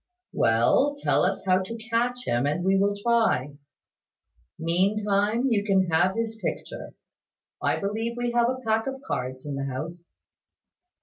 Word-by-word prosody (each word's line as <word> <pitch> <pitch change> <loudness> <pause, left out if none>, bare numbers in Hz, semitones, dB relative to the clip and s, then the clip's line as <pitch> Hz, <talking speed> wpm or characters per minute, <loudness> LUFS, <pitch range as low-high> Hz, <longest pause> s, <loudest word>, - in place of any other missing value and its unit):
"Well; 120 - +3
tell - - +3
us - - 0
how 185 0 +3
to 230 +5 -6
catch 245 +2 0
him, 120 +4 +1
and 150 +5 -1
we 190 +1 +3
will 200 +1 +2
try. 215 - +1 1.0
Meantime, 200 +6 +1
you 205 -3 +2
can 190 -3 +2
have 175 +4 +3
his 225 -1 -3
picture. - - -5 0.7
I - - +1
believe 225 +4 -3
we 245 0 -1
have 240 0 +3
a 255 - -1
pack 225 +2 +1
of 270 0 -4
cards 130 +1 -4
in 145 - -4
the 135 0 -3
house." 165 +6 -7
200 Hz, 150 wpm, -26 LUFS, 165-230 Hz, 1.0 s, Well